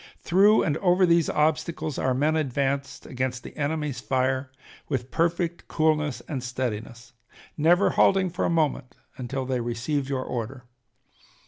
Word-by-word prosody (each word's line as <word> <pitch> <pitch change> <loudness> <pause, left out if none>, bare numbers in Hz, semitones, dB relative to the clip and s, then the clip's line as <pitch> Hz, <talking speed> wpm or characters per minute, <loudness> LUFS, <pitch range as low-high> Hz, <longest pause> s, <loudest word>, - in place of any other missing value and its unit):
Through 200 +5 +5
and 150 -1 0
over 185 0 +3
these 170 -2 +3
obstacles 155 0 0
our 130 -1 +1
men 150 +4 +2
advanced 140 -1 -1
against 130 -1 -3
the - - -10
enemy's 150 -3 -2
fire 130 +1 -1 0.4
with 130 -1 -3
perfect 170 +1 -1
coolness 155 -3 +1
and 135 -4 -5
steadiness, 120 -2 -5 0.4
never 175 +5 +4
halting 190 -2 +3
for 180 - -2
a - - +1
moment 150 -6 0 0.2
until 130 +1 -4
they 130 -1 -1
received 120 +4 -2
your 130 -2 -1
order. 125 +1 -5
140 Hz, 140 wpm, -25 LUFS, 130-160 Hz, 0.4 s, Through